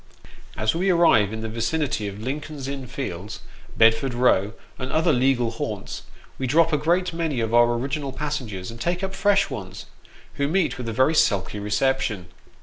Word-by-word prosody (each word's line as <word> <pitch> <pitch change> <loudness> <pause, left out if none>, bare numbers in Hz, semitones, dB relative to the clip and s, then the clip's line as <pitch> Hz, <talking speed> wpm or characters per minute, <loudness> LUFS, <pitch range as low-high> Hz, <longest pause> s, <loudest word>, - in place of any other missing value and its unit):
As 110 0 +1
we 185 +4 0
arrive 165 - +4
in 110 0 -5
the 110 - -3
vicinity 115 +1 -1
of 100 +1 -7
Lincoln's 140 +3 -5
Inn 135 -2 -5
Fields, 105 -6 -6 0.4
Bedford 115 +3 +4
Row, 110 -4 +3 0.3
and 130 -1 -4
other 160 0 +3
legal 125 -2 +2
haunts, 115 - -5 0.4
we 130 - -1
drop 165 +4 +3
a - - +4
great 175 +4 +1
many 165 -6 -1
of 115 0 -2
our 120 0 +5
original 135 +3 -3
passengers, 125 -10 -4
and 115 0 -10
take 175 +2 -1
up 190 0 -3
fresh 200 0 +2
ones, 95 -1 -7 0.6
who 140 - +2
meet 175 -3 0
with 120 -2 -4
a - - -2
very 130 +7 +3
sulky 105 - +1
reception. 105 -3 0
130 Hz, 175 wpm, -24 LUFS, 110-155 Hz, 0.6 s, our